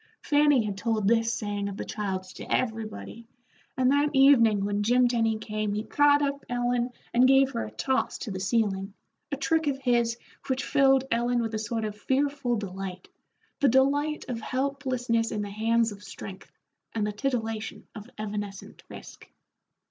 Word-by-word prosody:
Fanny 290 Hz, -4 st, +4 dB
had 200 Hz, -1 st, -4 dB
told 220 Hz, -2 st, 0 dB
this 225 Hz, +1 st, +3 dB
saying 205 Hz, -3 st, -3 dB
of 200 Hz, -, -7 dB
the -, -, -4 dB
child's 190 Hz, -3 st, -4 dB
to -, -, -9 dB
everybody, 225 Hz, 0 st, -3 dB, 0.5 s
and 255 Hz, 0 st, +3 dB
that 285 Hz, +1 st, +3 dB
evening 230 Hz, -7 st, +5 dB
when 205 Hz, 0 st, -1 dB
Jim 245 Hz, +4 st, +4 dB
Tenny 225 Hz, -2 st, +1 dB
came 215 Hz, -1 st, -3 dB
he 210 Hz, -, -2 dB
caught 290 Hz, +3 st, +4 dB
up 280 Hz, 0 st, -2 dB
Ellen 245 Hz, 0 st, 0 dB, 0.2 s
and 250 Hz, +2 st, +5 dB
gave 270 Hz, 0 st, +5 dB
her 110 Hz, -, -3 dB
a -, -, -7 dB
toss 260 Hz, -, -1 dB
to 220 Hz, -, -6 dB
the 190 Hz, -, -4 dB
ceiling, 195 Hz, -1 st, 0 dB, 0.4 s
a 280 Hz, -, -1 dB
trick 320 Hz, +3 st, +1 dB
of 280 Hz, -2 st, +1 dB
his 240 Hz, -3 st, +1 dB, 0.3 s
which 260 Hz, 0 st, -1 dB
filled 270 Hz, -1 st, +4 dB
Ellen 240 Hz, +1 st, +1 dB
with 225 Hz, -1 st, -2 dB
a 215 Hz, -, -1 dB
sort 220 Hz, +1 st, -2 dB
of 210 Hz, -1 st, -4 dB
fearful 270 Hz, +2 st, 0 dB
delight, 190 Hz, -3 st, -6 dB, 0.5 s
the 280 Hz, -, +4 dB
delight 285 Hz, +4 st, +2 dB
of 240 Hz, -3 st, -4 dB
helplessness 255 Hz, -3 st, -1 dB
in 210 Hz, -1 st, -2 dB
the 205 Hz, -, -6 dB
hands 225 Hz, +2 st, +1 dB
of 205 Hz, 0 st, -11 dB
strength, 195 Hz, -1 st, -10 dB, 0.4 s
and 215 Hz, -2 st, 0 dB
the 210 Hz, -, -1 dB
titillation 225 Hz, -2 st, -3 dB
of 215 Hz, +2 st, -10 dB
evanescent 205 Hz, -2 st, -6 dB
risk. -, -, -12 dB
230 Hz, 170 wpm, -27 LUFS, 210-265 Hz, 0.5 s, evening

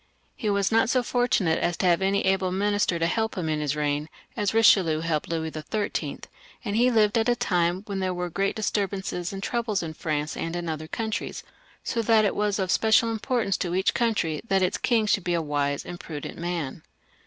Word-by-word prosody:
He 220 Hz, -, -2 dB
was 200 Hz, 0 st, +1 dB
not 225 Hz, 0 st, +3 dB
so 250 Hz, 0 st, +2 dB
fortunate 240 Hz, -10 st, +1 dB
as 175 Hz, -, 0 dB
to -, -, -1 dB
have 175 Hz, 0 st, +3 dB
any 195 Hz, +1 st, +1 dB
great 190 Hz, 0 st, +2 dB
minister 205 Hz, -2 st, +1 dB
to 165 Hz, -, 0 dB
help 220 Hz, +6 st, -1 dB
him 175 Hz, -3 st, -2 dB
in 155 Hz, -1 st, 0 dB
his 150 Hz, -1 st, -1 dB
reign, 150 Hz, 0 st, -1 dB, 0.3 s
as 205 Hz, -3 st, 0 dB
Eichelieu 185 Hz, -8 st, +4 dB
helped 160 Hz, -2 st, -1 dB
Louis 160 Hz, -1 st, -2 dB
XIIL, 200 Hz, +8 st, -3 dB, 0.4 s
and 205 Hz, -1 st, -2 dB
he 245 Hz, +3 st, +4 dB
lived 220 Hz, -1 st, +3 dB
at 225 Hz, +2 st, +1 dB
a 240 Hz, -, +3 dB
time 180 Hz, -3 st, 0 dB
when 200 Hz, -2 st, -4 dB
there 185 Hz, -1 st, 0 dB
were 180 Hz, -1 st, -3 dB
great 195 Hz, +3 st, 0 dB
disturbances 195 Hz, -4 st, -2 dB
and 195 Hz, 0 st, -6 dB
troubles 225 Hz, -5 st, -1 dB
in 160 Hz, -1 st, -5 dB
France 150 Hz, -1 st, -2 dB
and 165 Hz, +1 st, -3 dB
in 175 Hz, -1 st, -3 dB
other 155 Hz, -1 st, -4 dB
countries, 220 Hz, +4 st, -4 dB, 0.4 s
so 230 Hz, -, -1 dB
that 225 Hz, -1 st, +4 dB
it 200 Hz, -, 0 dB
was 210 Hz, -1 st, 0 dB
of 190 Hz, -2 st, -1 dB
special 225 Hz, +1 st, +4 dB
importance 225 Hz, -3 st, 0 dB
to 175 Hz, -1 st, -2 dB
each 190 Hz, +1 st, +2 dB
country 210 Hz, -10 st, 0 dB
that 195 Hz, -2 st, +2 dB
its 180 Hz, -, 0 dB
king 230 Hz, -3 st, +2 dB
should 205 Hz, -2 st, +1 dB
be 175 Hz, -1 st, 0 dB
a -, -, +1 dB
wise 145 Hz, -2 st, -1 dB
and 175 Hz, 0 st, -7 dB
prudent 150 Hz, -3 st, -7 dB
man. 170 Hz, -5 st, -3 dB
190 Hz, 210 wpm, -26 LUFS, 165-215 Hz, 0.4 s, Eichelieu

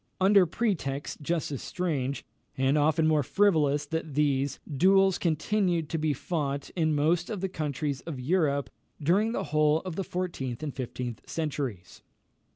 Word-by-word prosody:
Upon 190 Hz, +2 st, +4 dB
pretexts 160 Hz, -9 st, -2 dB
just 160 Hz, +1 st, -1 dB
as 140 Hz, -, -4 dB
strange, 140 Hz, -7 st, -2 dB, 0.3 s
and 135 Hz, +2 st, +2 dB
often 155 Hz, +1 st, +3 dB
more 155 Hz, -1 st, +4 dB
frivolous 150 Hz, -3 st, +2 dB
that 160 Hz, -1 st, -4 dB
these, 140 Hz, -2 st, +1 dB
duels 190 Hz, +5 st, +3 dB
continued 170 Hz, 0 st, 0 dB
to 165 Hz, -, -1 dB
be 155 Hz, 0 st, +1 dB
fought 140 Hz, -1 st, -3 dB
in 160 Hz, -3 st, +1 dB
most 165 Hz, +4 st, +1 dB
of 215 Hz, -4 st, -3 dB
the 190 Hz, -, -1 dB
countries 145 Hz, -4 st, -3 dB
of 150 Hz, -6 st, -6 dB
Europe 140 Hz, -1 st, +1 dB, 0.3 s
during 190 Hz, +9 st, +2 dB
the -, -, -2 dB
whole 155 Hz, +1 st, +4 dB
of 180 Hz, -3 st, -6 dB
the 195 Hz, -, 0 dB
fourteenth 170 Hz, -10 st, -4 dB
and 145 Hz, -3 st, -3 dB
fifteenth 125 Hz, -3 st, -6 dB
centuries. 135 Hz, -, -4 dB
155 Hz, 155 wpm, -28 LUFS, 140-175 Hz, 0.3 s, Upon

